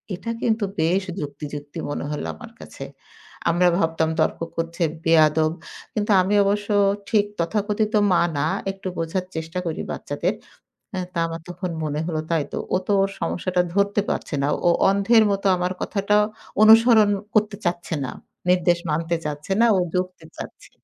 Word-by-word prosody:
এটা 230 Hz, +6 st, -5 dB
কিন্তু 220 Hz, -2 st, +1 dB, 0.2 s
বেশ 180 Hz, +5 st, +2 dB, 0.2 s
যুক্তি, 145 Hz, +1 st, -6 dB
যুক্তি 145 Hz, 0 st, -8 dB
মনে 145 Hz, -, -3 dB
হলো 150 Hz, -, -3 dB
আমার -, -, -11 dB
কাছে। -, -, -9 dB, 0.7 s
আমরা 175 Hz, +2 st, +3 dB
ভাবতাম 160 Hz, -2 st, +1 dB
তর্ক 155 Hz, -, +1 dB, 0.2 s
করছে, 165 Hz, +1 st, -2 dB, 0.2 s
বেয়াদব! 155 Hz, -1 st, +4 dB, 0.4 s
কিন্তু 210 Hz, 0 st, 0 dB
আমি 195 Hz, +3 st, +1 dB
অবশ্য 205 Hz, +1 st, 0 dB, 0.4 s
ঠিক 210 Hz, -3 st, +3 dB
তথাকথিত 210 Hz, +4 st, 0 dB, 0.2 s
মা 175 Hz, -, +4 dB, 0.2 s
না। -, -, +1 dB, 0.2 s
একটু 195 Hz, 0 st, -8 dB
বোঝার 165 Hz, +3 st, -2 dB
চেষ্টা 160 Hz, +3 st, -4 dB
করি 165 Hz, -2 st, -3 dB
বাচ্চাদের। 170 Hz, +7 st, -2 dB, 0.6 s
আ -, -, -2 dB, 0.2 s
তা -, -, -3 dB
আমার 165 Hz, 0 st, -6 dB
তখন 180 Hz, +1 st, -4 dB
মনে 150 Hz, 0 st, -2 dB
হল 170 Hz, -2 st, -2 dB
তাই 165 Hz, -3 st, +1 dB
তো। -, -, -2 dB, 0.2 s
ও -, -, +4 dB
তো -, -, +1 dB
ওর 195 Hz, -, 0 dB
সমস্যাটা 180 Hz, +2 st, 0 dB
ধরতে 200 Hz, +1 st, +2 dB
পারছে -, -, -3 dB
না। 140 Hz, -, +1 dB, 0.2 s
ও -, -, +7 dB, 0.2 s
অন্ধের 200 Hz, +4 st, +4 dB
মত 195 Hz, 0 st, -1 dB
আমার 180 Hz, +1 st, -1 dB
কথাটা 205 Hz, 0 st, +1 dB, 0.5 s
অনুসরণ 220 Hz, -1 st, +7 dB, 0.2 s
করতে 215 Hz, -1 st, +2 dB
চাচ্ছে 175 Hz, -1 st, -2 dB
না। 130 Hz, -, -4 dB, 0.4 s
নির্দেশ 175 Hz, -1 st, +3 dB
মানতে 165 Hz, +2 st, 0 dB
চাচ্ছে 150 Hz, +4 st, -4 dB
না। 235 Hz, -, +6 dB
ও -, -, +2 dB, 0.2 s
যুক্তি 180 Hz, -2 st, -2 dB
চাচ্ছে। -, -, -9 dB
180 Hz, 165 wpm, -23 LUFS, 160-200 Hz, 0.7 s, ও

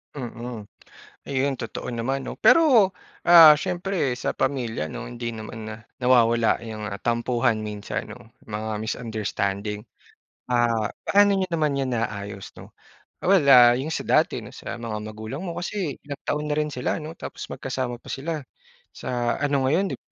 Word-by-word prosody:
Mm, 120 Hz, -4 st, -6 dB, 0.6 s
ayun 135 Hz, -1 st, 0 dB
totoo 115 Hz, +1 st, -5 dB
naman 130 Hz, +3 st, -2 dB
'no, -, -, -7 dB
pero, 245 Hz, -, +5 dB, 0.3 s
ah, 165 Hz, -3 st, +10 dB
siyempre 180 Hz, -5 st, -1 dB
sa 125 Hz, -, -2 dB
pamilya 120 Hz, -, -1 dB
'no 80 Hz, -, -7 dB
hindi 120 Hz, -1 st, -5 dB
naman 110 Hz, 0 st, -8 dB, 0.3 s
nawawala 120 Hz, -3 st, +3 dB
yung 110 Hz, -2 st, -6 dB, 0.2 s
tampuhan 120 Hz, 0 st, +1 dB
minsan 105 Hz, -1 st, -4 dB
'no, 115 Hz, -, -16 dB, 0.2 s
mga 110 Hz, 0 st, -4 dB
misunderstanding. 105 Hz, -2 st, -3 dB, 0.7 s
Ah, 120 Hz, -3 st, +2 dB, 0.2 s
paano 205 Hz, 0 st, +4 dB
niyo 190 Hz, -1 st, 0 dB
naman 155 Hz, -4 st, +1 dB
yan 135 Hz, -2 st, -1 dB
naayos 100 Hz, -4 st, -4 dB
'no. -, -, -12 dB, 0.5 s
Well, 185 Hz, -6 st, +4 dB
ah, 125 Hz, -3 st, +8 dB
yung 155 Hz, +5 st, -3 dB
sa -, -, -2 dB
dati -, -, +2 dB
'no -, -, -10 dB
sa -, -, -7 dB
mga 115 Hz, -2 st, -5 dB
magulang 110 Hz, +7 st, -6 dB
mo 170 Hz, -, -4 dB
kasi 175 Hz, -2 st, -4 dB
ilang 140 Hz, -1 st, -7 dB
taon 150 Hz, 0 st, -1 dB
na 150 Hz, -, 0 dB
rin 150 Hz, -, +1 dB
sila 125 Hz, -, -1 dB
'no 160 Hz, 0 st, -7 dB
tapos -, -, -8 dB
magkasama 125 Hz, -2 st, -4 dB
pa -, -, -11 dB
sila 155 Hz, +2 st, -3 dB, 0.5 s
sa 120 Hz, -1 st, -2 dB
ano 140 Hz, -2 st, +1 dB
ngayon 185 Hz, +5 st, +1 dB
dip -, -, -13 dB
125 Hz, 155 wpm, -24 LUFS, 110-150 Hz, 0.7 s, ah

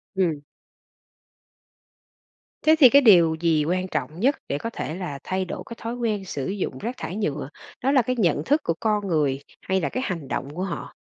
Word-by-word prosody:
Ừm. 170 Hz, -6 st, +1 dB, 2.2 s
Thế 315 Hz, +1 st, +6 dB
thì 260 Hz, -5 st, +9 dB
cái 280 Hz, +3 st, +7 dB
điều 175 Hz, -, +6 dB
gì 160 Hz, -3 st, +2 dB
quan 185 Hz, +3 st, 0 dB
trọng 165 Hz, -2 st, -4 dB
nhất 270 Hz, +7 st, +3 dB
để 140 Hz, -, -1 dB
có 230 Hz, -, -4 dB
thể 155 Hz, -, -4 dB
là 175 Hz, -7 st, -5 dB
thay 185 Hz, 0 st, -2 dB
đổi 185 Hz, -, -6 dB
cái 230 Hz, -, -8 dB
thói 230 Hz, +1 st, -4 dB
quen 220 Hz, -5 st, -2 dB
sử 140 Hz, -7 st, -4 dB
dụng 195 Hz, 0 st, -3 dB
rác 235 Hz, +4 st, -5 dB
thải 180 Hz, -, -5 dB
nhựa, 150 Hz, -10 st, -2 dB, 0.3 s
đó 270 Hz, -, +3 dB
là 275 Hz, -2 st, +5 dB
cái 255 Hz, +2 st, -1 dB
nhận 170 Hz, -10 st, +1 dB
thức 295 Hz, -, +2 dB
của 165 Hz, -, 0 dB
con 210 Hz, -2 st, 0 dB
người 150 Hz, -6 st, +1 dB, 0.2 s
hay 190 Hz, 0 st, 0 dB
là 140 Hz, -, -1 dB
cái 255 Hz, -, -3 dB
hành 165 Hz, -7 st, -4 dB
động 135 Hz, -, -3 dB
của 180 Hz, -, -2 dB
họ? 190 Hz, -3 st, -5 dB
185 Hz, 205 wpm, -24 LUFS, 160-230 Hz, 2.2 s, thì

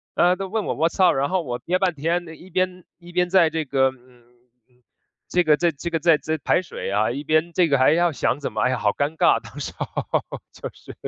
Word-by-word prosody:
呃， 180 Hz, +1 st, +4 dB
都 195 Hz, +1 st, -5 dB
问 215 Hz, +2 st, -2 dB
我： -, -, -1 dB
"What’s 165 Hz, +5 st, 0 dB
up？"， -, -, +6 dB
然 140 Hz, +1 st, 0 dB
后 185 Hz, -2 st, 0 dB
我 125 Hz, -4 st, -4 dB
憋 180 Hz, +1 st, 0 dB
半 185 Hz, -2 st, +1 dB
天， 170 Hz, +5 st, -1 dB, 0.2 s
一 185 Hz, -, -14 dB
边 185 Hz, 0 st, -1 dB, 0.2 s
一 175 Hz, 0 st, -13 dB
边 180 Hz, 0 st, +1 dB
在 175 Hz, -3 st, +5 dB
这 160 Hz, -1 st, -3 dB
个， 135 Hz, -1 st, +2 dB
嗯， 125 Hz, -1 st, -22 dB, 0.5 s
嗯， 125 Hz, 0 st, -33 dB, 0.4 s
这 180 Hz, -, +2 dB
个 155 Hz, -2 st, +4 dB
在 170 Hz, 0 st, +2 dB
这 160 Hz, +4 st, -6 dB
个 165 Hz, -1 st, -1 dB
在 165 Hz, -1 st, +4 dB
在 160 Hz, 0 st, -2 dB
排 150 Hz, -, +1 dB
水 165 Hz, -, -6 dB
啊， 105 Hz, +3 st, +1 dB
一 140 Hz, +4 st, -5 dB
边 155 Hz, +3 st, +1 dB
这 180 Hz, -2 st, +3 dB
个 140 Hz, -3 st, +2 dB
还 130 Hz, +3 st, +5 dB
要 175 Hz, +1 st, +2 dB
想 140 Hz, -2 st, -1 dB
怎 140 Hz, -, -5 dB
么， 110 Hz, -, -1 dB
哎 130 Hz, -, +3 dB
呀， 130 Hz, -, 0 dB
好 105 Hz, -2 st, +1 dB
尴 145 Hz, +3 st, -2 dB
尬。 -, -, +4 dB
当 -, -, -11 dB
时 -, -, -5 dB
候， -, -, -3 dB, 0.6 s
就 -, -, -7 dB
是 -, -, -13 dB
160 Hz, 300 characters per minute, -23 LUFS, 135-175 Hz, 0.6 s, up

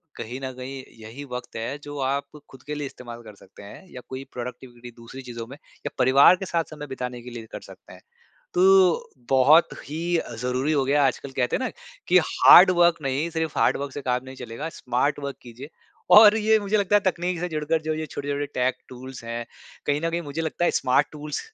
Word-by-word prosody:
कहीं 120 Hz, +3 st, -6 dB
न 130 Hz, -, -3 dB
कहीं 130 Hz, +1 st, -7 dB, 0.2 s
यही 115 Hz, +6 st, -9 dB
वक़्त 125 Hz, 0 st, -7 dB
है 115 Hz, +5 st, -4 dB
जो 145 Hz, 0 st, -8 dB
आप 140 Hz, +2 st, -3 dB
खुद 130 Hz, -, -15 dB
के 150 Hz, +1 st, -5 dB
लिए 145 Hz, -1 st, -4 dB
इस्तेमाल 120 Hz, -3 st, -10 dB
कर 110 Hz, -2 st, -12 dB
सकते 95 Hz, +1 st, -16 dB
हैं। 100 Hz, -, -12 dB
या 125 Hz, -, -8 dB
कोई 130 Hz, +1 st, -6 dB
प्रोडक्टिविटी 120 Hz, 0 st, -8 dB
दूसरी 115 Hz, +3 st, -10 dB
चीज़ों 120 Hz, -3 st, -8 dB
में 135 Hz, +4 st, -11 dB, 0.3 s
या -, -, -1 dB
परिवार 135 Hz, +7 st, +6 dB
के 190 Hz, -, -6 dB
साथ 170 Hz, -2 st, 0 dB
समय 150 Hz, -1 st, -8 dB
बिताने 125 Hz, -2 st, -6 dB
के 125 Hz, -, -10 dB
लिए 120 Hz, -2 st, -8 dB
कर -, -, -6 dB
सकते -, -, -14 dB
हैं। -, -, -15 dB, 0.5 s
तो 185 Hz, -1 st, +4 dB, 0.2 s
बहुत 135 Hz, +5 st, +6 dB, 0.2 s
ही 160 Hz, +4 st, -5 dB
अ, 120 Hz, -, -5 dB
ज़रूरी 125 Hz, +5 st, -1 dB
हो 140 Hz, -3 st, +2 dB
गया 145 Hz, +2 st, +2 dB
आजकल 135 Hz, +1 st, -3 dB
कहते 125 Hz, -2 st, +1 dB
हैं -, -, -4 dB
ना -, -, -2 dB, 0.4 s
कि -, -, +6 dB
हार्ड 185 Hz, +2 st, +8 dB
वर्क 170 Hz, 0 st, +5 dB
नहीं 135 Hz, +4 st, -1 dB
सिर्फ 160 Hz, -1 st, -3 dB
हार्ड -, -, +3 dB
वर्क 140 Hz, 0 st, -5 dB
से 145 Hz, -, -6 dB
काम 125 Hz, -1 st, -1 dB
नहीं 130 Hz, 0 st, -10 dB
चलेगा 125 Hz, +5 st, -6 dB
स्मार्ट 125 Hz, +4 st, 0 dB
वर्क 140 Hz, -1 st, -5 dB
कीजिए। 125 Hz, +4 st, -11 dB, 0.5 s
और 210 Hz, 0 st, +9 dB
ये 220 Hz, 0 st, +3 dB
मुझे 205 Hz, +1 st, 0 dB
लगता 205 Hz, 0 st, +3 dB
है -, -, +4 dB
तकनीक 180 Hz, -1 st, -1 dB
से 180 Hz, -, -2 dB
जुड़कर 155 Hz, 0 st, -1 dB
जो 155 Hz, 0 st, -2 dB
ये 155 Hz, 0 st, -4 dB
छोटे-छोटे 145 Hz, 0 st, -4 dB
टेक 125 Hz, +1 st, +1 dB
टूल्स 130 Hz, 0 st, -10 dB
हैं। 115 Hz, 0 st, -4 dB, 0.4 s
कहीं 145 Hz, 0 st, +1 dB
न 165 Hz, +1 st, -1 dB
कहीं 170 Hz, +1 st, -2 dB
मुझे 150 Hz, +1 st, -5 dB
लगता 165 Hz, +2 st, -2 dB
है -, -, +3 dB
स्मार्ट 125 Hz, -1 st, +2 dB
टूल्स 150 Hz, -1 st, -5 dB
140 Hz, 220 wpm, -24 LUFS, 125-160 Hz, 0.5 s, और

